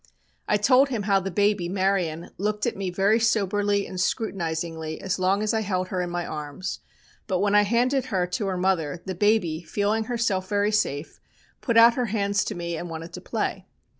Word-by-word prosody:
I 210 - +3
told 255 +6 +4
him 230 -6 -2
how 195 -1 +3
the 195 0 -4
baby, 200 -1 +1
Marian, 185 -4 -1
looked 210 +1 -1
at - - -1
me 195 -1 -3
very 195 +5 +2
soberly 205 -2 +1
and 185 - -6
scrutinisingly 165 -6 -2
as 190 -1 -2
long 190 +3 +2
as 215 - 0
I 220 - +1
held 185 -3 -2
her 185 - -1
in 175 - -3
my 175 0 -3
arms, 150 +5 -5 0.5
but 190 -3 0
when 200 +2 +1
I 210 - +7
handed 245 +5 +1
her 185 -4 0
to 180 +3 -3
her 190 -1 -1
mother, 180 -3 0
the 190 - -3
baby, 180 -4 +1
feeling 205 +6 -1
herself 220 -6 -1
very 205 0 +1
safe, 160 -8 -1 0.4
put 235 -3 +1
out 230 +1 +8
her 250 0 -1
hands 205 -1 0
to - - -4
me 170 -1 -4
and 175 +2 -5
wanted 165 +1 -7
to - - -7
play. - - -3
195 Hz, 200 wpm, -25 LUFS, 175-210 Hz, 0.5 s, out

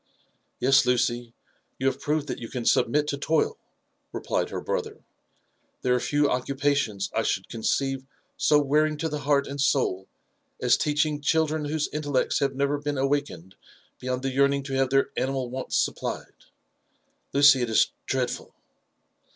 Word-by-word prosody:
Yes, 135 +1 +5
Lucy, 120 -1 0 0.4
you 130 - -4
have 135 -1 +1
proved 150 -1 0
that 145 - -5
you 115 - -7
can 125 -3 -5
submit 150 +5 +2
to 140 - -3
toil,^' 160 +2 +1 0.5
replied - - -2
her - - -4
brother. - - -3
^' - - -26 0.8
There 125 - +2
are 125 - +2
few 145 +3 +1
occupations 135 -5 -1
I 110 - +1
should 95 -3 -1
conceive 135 +3 -1 0.3
so 150 - +3
wearing 150 +2 +2
to 160 +2 -2
the 150 -1 -3
heart 140 -1 +2
and 140 0 -5
soul 95 -10 +1 0.5
as - - +4
teaching 150 0 0
children 155 0 +1
whose 150 0 -1
intellects 145 -3 0
have 140 -1 0
never 140 +1 0
been 145 -1 -3
awakened 135 - -2 0.5
beyond 130 0 -3
the 135 - -1
yearning 140 +1 +2
to 135 0 -6
have 135 -1 +1
their 135 0 +2
animal 130 -2 -2
wants 130 0 -2
supplied; - - -2 0.5
— - - -45
^Lucy, 140 -2 +7
it 120 - -1
is 110 - +3 0.2
dreadful 130 -2 -2
140 Hz, 160 wpm, -26 LUFS, 125-145 Hz, 0.8 s, ^Lucy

